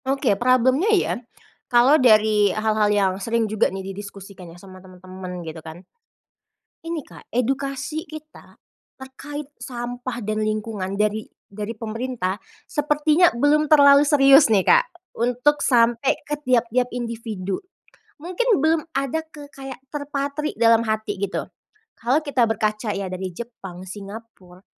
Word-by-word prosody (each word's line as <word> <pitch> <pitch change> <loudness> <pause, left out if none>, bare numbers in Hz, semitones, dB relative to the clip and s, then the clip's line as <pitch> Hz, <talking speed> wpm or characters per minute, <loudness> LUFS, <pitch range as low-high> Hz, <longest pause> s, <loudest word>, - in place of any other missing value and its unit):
Oke 270 -4 +1
problem-nya 255 - +2
ya, - - 0 0.6
kalau 255 +5 +5
dari 215 -3 +5
hal-hal 215 +1 +1
yang 200 -2 +2
sering 230 +2 0
juga 215 0 +1
nih 190 0 -7
didiskusikan 195 -2 -10
ya, 165 - -13
sama 185 0 -14
temen-temen 185 -1 -9
gitu 160 0 -7
kan. 160 +3 -11 1.0
Ini 330 -2 -3
Kak, - - -16
edukasi 275 +5 -2
kita 310 0 -12 0.4
terkait 280 +2 -9
sampah 245 0 -6
dan 215 +1 -2
lingkungan 215 -2 -3
dari 210 +1 -1 0.3
dari 210 +3 -5
pemerintah 225 -3 -4 0.3
sepertinya 300 +3 +2
belum 290 +5 +3
terlalu 285 -1 +6
serius 275 -1 +6
nih 195 - +4
Kak, - - +4 0.3
untuk 250 +5 +2
sampai 240 +1 +3
ke 295 0 -4
tiap-tiap 245 0 +2
individu, 225 -5 -4 0.6
mungkin 360 +10 -3 0.2
belum 320 0 +2
ada 275 +3 -1 0.2
kayak 270 -3 -10
terpatri 285 +1 -3
dalam 230 0 +4
hati 215 -2 -2
gitu, 200 -1 -2 0.6
kalau 265 +7 +1
kita 270 -6 +1
berkaca 215 0 -1
ya 195 -2 -4
dari 185 -1 -5
Jepang, 195 -5 -9
Singapura, 195 -1 -11
235 Hz, 130 wpm, -22 LUFS, 205-280 Hz, 1.0 s, terlalu